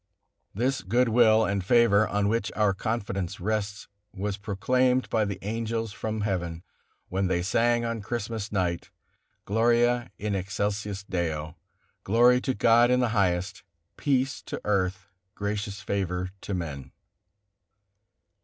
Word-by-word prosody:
This 130 +5 0
good 120 +5 +2
will 110 -1 +5
and 100 -1 -1
favor, 110 0 +4
on 100 0 0
which 110 -2 0
our 105 -1 +3
confidence 100 -3 -3
rests, 105 +1 -2 0.2
was 100 0 -3
proclaimed 125 +6 +1
by 110 -2 +2
the 100 -1 -3
angels 115 +1 -2
from 110 -1 -3
heaven, 85 -4 -2 0.5
when 95 +1 0
they 90 -1 0
sang 120 +4 +2
on 115 -1 -3
Christmas 110 -1 -4
night: 90 -4 -1 0.6
"Gloria 120 +3 +2
in 105 0 -2
excelsis 100 +1 -2
Deo, 80 -5 -3 0.5
Glory 120 +4 +4
to 130 -1 -1
God 115 +3 +5
in 125 0 +3
the 125 -2 +2
highest, 95 -3 0 0.3
peace 135 -1 0
to - - -6
earth, 95 -2 0 0.3
gracious 105 0 -3
favor 90 -2 -2
to 100 - -3
man." 75 -7 -5
105 Hz, 130 wpm, -27 LUFS, 95-115 Hz, 0.6 s, will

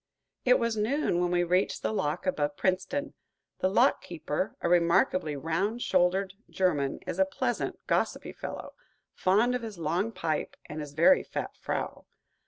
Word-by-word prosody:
It 250 0 +6
was 230 -1 0
noon 220 - +1
when 175 - +1
we 175 0 +2
reached 180 +3 +1
the - - 0
lock 155 -3 -1
above 145 -5 -1
Princeton. 195 +11 -1 0.5
The 185 - +2
lock 245 +8 +3
keeper, 165 +2 -3
a - - -1
remarkably 170 -2 +3
round 180 - -1
shouldered 185 +1 +2 0.2
German, 150 -8 0
is - - -4
a - - +7
pleasant, 285 - -2
gossipy - - -1
fellow, - - -7 0.4
fond 215 +7 +3
of 250 - -1
his 220 -4 -7
long 170 +7 -1
pipe 160 -7 -2
and 150 - -7
his 145 -1 -8
very 280 - +5
fat - - -5
frau. - - -4
185 Hz, 160 wpm, -29 LUFS, 165-220 Hz, 0.5 s, a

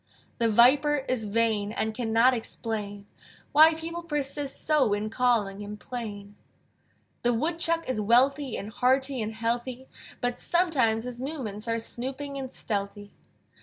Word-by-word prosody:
The 230 -1 +3
Viper 270 +5 +4
is 245 -4 -1
vain, 210 -1 0
And 220 0 -2
cannot 230 +2 +3
explain 210 -3 -4 0.5
Why 315 +2 +7
people 335 +2 -5
persist 290 -3 -3
so 285 -8 +3
In 210 +1 -2
calling 225 -5 +1
him 205 +1 -7
plain. 205 -4 -7 0.9
The 240 0 +2
Woodchuck 330 +4 0
is 255 -5 -1
wealthy, 260 +5 +3
And 205 +2 -6
hearty 260 +2 +1
and 215 0 -3
healthy: 240 +3 -3 0.3
But 245 0 -2
sometimes 270 -11 +2
his 245 -1 -6
movements 245 -7 -5
Are 230 0 0
snooping 265 +5 -5
and 260 -1 -6
stealthy. 205 -1 -4
240 Hz, 135 wpm, -27 LUFS, 220-275 Hz, 0.9 s, Why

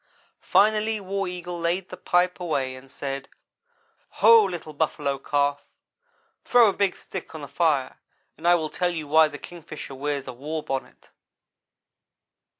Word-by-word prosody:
Finally 215 +1 +3
War 195 0 -3
Eagle 180 -1 -6
laid 175 +2 -1
the - - -7
pipe 180 0 +1
away 140 -7 -1
and 130 +1 -14
said: 135 0 -5 0.9
"Ho! 225 +1 +8
Little 175 -5 -5
Buffalo 145 -2 -1
Calf, 145 0 0 0.8
throw 240 -3 +6
a - - -1
big 200 -2 0
stick 185 -3 -8
on 155 - -7
the 145 - -7
fire 145 -3 0 0.4
and 165 +3 -4
I 175 - +7
will 155 -3 -2
tell 180 -1 0
you 160 -4 -4
why 160 +2 +6
the 145 -1 -8
Kingfisher 155 -4 -9
wears 140 0 -3
a 130 - -5
war 150 +5 -5
bonnet." 135 -1 -6
160 Hz, 150 wpm, -25 LUFS, 145-180 Hz, 0.9 s, Ho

